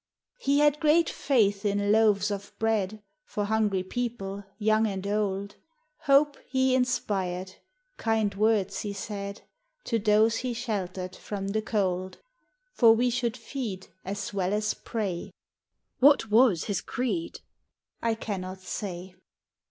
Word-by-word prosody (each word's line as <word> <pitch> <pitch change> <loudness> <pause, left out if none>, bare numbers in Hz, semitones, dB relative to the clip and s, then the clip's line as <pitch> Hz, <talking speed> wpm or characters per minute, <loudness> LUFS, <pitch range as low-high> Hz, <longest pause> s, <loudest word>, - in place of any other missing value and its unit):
He 280 - +2
had 295 0 +4
great 320 +2 +4
faith 205 -8 +2
in 205 0 +1
loaves 210 -2 +4
of 200 0 -6
bread 215 -2 0 0.2
For 210 - -3
hungry 205 -3 +1
people, 200 -2 -4
young 220 +1 +3
and 195 -2 -4
old, 200 -1 -1 0.5
Hope 285 +1 +4
he 260 0 +2
inspired; 190 -8 -1 0.4
kind 220 -2 +1
words 200 -2 +1
he 205 -1 -4
said 200 0 -6 0.4
To 230 - 0
those 215 +2 +4
he 250 -2 -3
sheltered 190 -6 -3
from 195 -1 -5
the 215 +2 0
cold. 185 -4 -1 0.6
For 225 -2 +6
we 245 +2 +2
should 240 0 -1
feed 230 -5 -5
As 200 +2 -4
well 190 -1 0
as 210 0 0
pray. 200 -7 -4 0.7
"What 270 -5 +5
was 220 -7 +5
his 205 - -2
creed?" 260 +7 -3 0.6
I 230 -1 +1
cannot 190 -4 -5
say. 185 -1 -5
210 Hz, 130 wpm, -27 LUFS, 195-230 Hz, 0.7 s, For